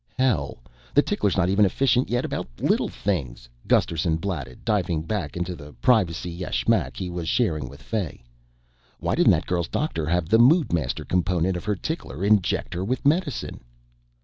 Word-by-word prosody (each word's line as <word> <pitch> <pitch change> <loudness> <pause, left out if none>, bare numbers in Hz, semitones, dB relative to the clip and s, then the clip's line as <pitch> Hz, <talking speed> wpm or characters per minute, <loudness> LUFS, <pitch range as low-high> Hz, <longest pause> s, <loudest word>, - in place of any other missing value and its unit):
"Hell, 105 - +1 0.4
the - - +7
tickler's 100 -3 0
not 90 -2 +3
even 100 +3 +3
efficient 125 +5 +2
yet 120 +1 0
about - - -3
little - - +2
things," 65 -12 -3 0.2
Gusterson 80 0 +2
blatted, 80 -9 -5
diving 90 -8 0
back 85 -4 -3
into 90 +1 -3
the 75 -1 -11
privacy 90 - +1
yashmak 85 -8 0
he 95 - -3
was 85 -2 -4
sharing 80 - 0
with 70 - -13
Fay. 100 - -4 0.8
"Whyn't - - +2
that - - +3
girl's 85 -2 -1
doctor 85 - -2
have 90 0 +1
the 110 +6 +4
Moodmaster 120 - +3
component 90 0 +1
of 90 - -5
her 105 -1 0
tickler 75 -1 -4
inject 100 -3 +2
her 90 +1 -3
with 125 +6 -2
medicine?" 150 0 0
90 Hz, 160 wpm, -24 LUFS, 80-105 Hz, 0.8 s, the